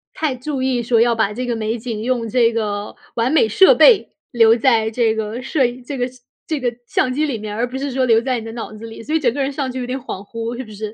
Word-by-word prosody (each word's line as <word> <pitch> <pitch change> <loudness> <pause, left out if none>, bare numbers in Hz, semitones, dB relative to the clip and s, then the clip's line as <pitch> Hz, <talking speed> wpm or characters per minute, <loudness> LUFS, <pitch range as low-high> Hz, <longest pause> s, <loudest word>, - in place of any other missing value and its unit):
太 310 -4 -1
注 265 +2 -4
意 260 -2 0
说 230 -1 +3
要 235 0 +4
把 220 -2 0
这 250 +4 -4
个 240 -1 -1
美 225 +1 -2
景 225 -2 -5
用 240 0 -1
这 235 -1 +3
个 210 -2 -3 0.2
完 235 +2 +1
美 300 -8 +4
设 380 - +6
备 465 -5 +6 0.2
留 225 -1 +5
在 230 -2 +2
这 225 -1 +1
个 220 +2 -4
摄 265 +1 +1
影 245 +1 -4
这 275 +2 -6
个 245 0 0 0.4
这 310 -3 -2
个 250 -2 0 0.2
相 255 - +1
机 300 +4 +1
里 275 -6 -2
面 210 -1 -6
儿， - - -5
而 245 - +1
不 260 - -5
是 280 +1 -3
说 260 0 +1
留 225 -2 +5
在 255 0 -1
你 225 - -9
的 225 - -6
脑 230 -1 -6
子 215 +1 -9
里， 225 0 -9
所 300 +7 -3
以 - - +3
整 245 -6 +1
个 280 - -2
人 270 - 0
上 275 -2 -3
去 260 - -5
有 250 - -3
点 250 +2 -3
恍 245 -7 -7
惚， 230 +2 -5
是 260 - -4
不 215 - -13
是？ 210 0 -6
240 Hz, 315 characters per minute, -19 LUFS, 225-260 Hz, 0.4 s, 设